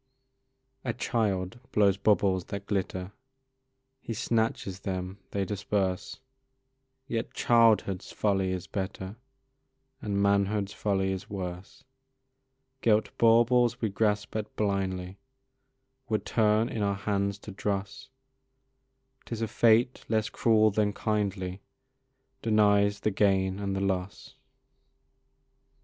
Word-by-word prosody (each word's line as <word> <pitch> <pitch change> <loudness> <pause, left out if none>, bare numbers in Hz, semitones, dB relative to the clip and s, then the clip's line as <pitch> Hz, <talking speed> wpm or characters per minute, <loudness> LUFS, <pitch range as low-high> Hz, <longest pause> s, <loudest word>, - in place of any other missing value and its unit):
A 120 - -1
child 110 -4 -1
blows 100 -2 +4
bubbles 100 -2 +2
that 100 0 -6
glitter, 95 -2 -2 0.9
He 115 - -5
snatches 110 -4 -1
them, 95 0 -4
they 100 -1 -1
disperse; 95 +1 -2 0.9
Yet 115 -4 -3
childhood's 115 -5 +3
folly 95 -3 0
is 90 -2 -3
better, 95 +1 -5 0.8
And 100 -2 -1
manhood's 100 0 +1
folly 95 -2 0
is 95 0 -5
worse; 90 -2 -6 1.0
Gilt 110 -1 +2
baubles 120 +1 +4
we 110 - 0
grasp 105 0 0
at 110 -1 -4
blindly 95 -2 -2 0.9
Would 110 -1 -1
turn 110 0 +2
in 110 - -4
our 100 -1 +1
hands 100 0 -1
to 105 - -10
dross; 100 +6 -4 1.2
'Tis 115 -1 -4
a - - 0
fate 115 +3 +3
less 110 -1 +1
cruel 110 -1 +3
than 105 0 +1
kindly 100 -4 -2 0.8
Denies 105 -2 +3
the 110 - +1
gain 95 -1 +2
and 100 -1 -2
the 95 - -2
loss. 100 +7 -3
100 Hz, 110 wpm, -28 LUFS, 95-110 Hz, 1.2 s, blows